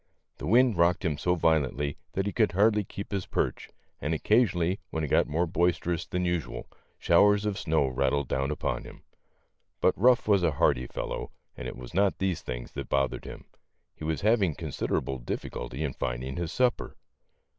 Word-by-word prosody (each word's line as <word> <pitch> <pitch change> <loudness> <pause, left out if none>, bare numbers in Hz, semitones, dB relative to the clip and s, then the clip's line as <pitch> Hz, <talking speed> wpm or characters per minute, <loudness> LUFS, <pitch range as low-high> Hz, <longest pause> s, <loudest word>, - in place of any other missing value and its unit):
The - - -5
wind 120 0 +4
rocked 85 +2 +3
him 80 -3 +1
so 90 +2 +1
violently 75 -4 +1 0.2
that 95 - -1
he 100 - -2
could 110 -6 +2
hardly 105 +2 +3
keep 100 +1 -8
his 100 -2 -2
perch, - - -2 0.3
and 75 +2 -1
occasionally 95 -2 +2
when 80 - -3
it 75 - -2
got - - +3
more 85 +4 +1
bois 85 0 +1
terous 85 -2 -3
than 90 0 -1
usual, 85 -8 -2 0.3
showers 105 +4 +4
of 105 -2 -1
snow 80 -3 +1
rattled 65 +1 0
down 70 +1 -1
upon 75 - -2
him. - - -13 0.8
But - - +3
Ruff 125 +4 +4
was 100 -3 +4
a 85 -4 +2
hardy 60 -2 +2
fellow - - -4 0.3
and - - -6
it - - -7
was 60 -1 -10
not 95 -2 +2
these 95 -3 -1
things - - -6
that 70 -3 -6
bothered 70 0 0
him; - - -9 0.5
he - - -11
was 80 -2 -1
having 100 -7 +3
considerable 70 -4 -2
difficulty - - -5
in 70 -4 -2
finding 65 +2 -3
his 85 -2 -3
sup 125 -2 +2
per. - - -9
85 Hz, 190 wpm, -28 LUFS, 70-100 Hz, 0.8 s, wind